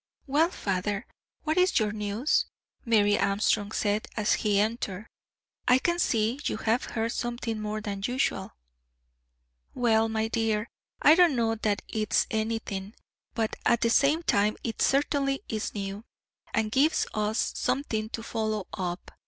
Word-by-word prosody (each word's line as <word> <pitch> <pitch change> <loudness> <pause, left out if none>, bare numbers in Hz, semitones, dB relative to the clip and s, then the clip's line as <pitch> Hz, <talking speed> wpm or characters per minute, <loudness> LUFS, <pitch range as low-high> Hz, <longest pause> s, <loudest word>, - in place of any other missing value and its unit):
"Well, 300 +5 +3
father, 200 - -2 0.4
what 315 +3 +1
is 365 +1 +3
your 215 -2 +2
news?" 210 +6 0 0.4
Mary 205 -3 +3
Armstrong 200 +1 +1
said, 210 0 0
as 210 -1 +2
he 205 -2 +2
entered. 210 -2 -1 0.6
"I 250 - +6
can 345 +6 0
see 230 -3 +1
you - - -1
have 225 +3 0
heard 225 0 -2
something 240 -2 -3
more 215 0 -3
than 200 -2 -4
usual." 250 -6 -1 1.2
"Well, 225 -2 +3
my 220 0 0
dear, 225 -1 0 0.3
I 300 - +8
don't 340 -4 +5
know 225 -2 +1
that 215 -2 -1
it's 215 -2 +1
anything, 220 -2 -3 0.4
but 225 -2 -1
at 235 - +3
the 230 - +2
same 295 +7 +3
time 210 -6 +2
it 230 - -4
certainly 275 0 +1
is 215 -1 -3
new, 200 +1 -4 0.5
and 220 -1 0
gives 285 +7 +3
us 215 +1 0
something 250 -4 -1
to 225 - -5
follow 215 -3 -2
up. 180 -1 -4
220 Hz, 145 wpm, -28 LUFS, 210-245 Hz, 1.2 s, I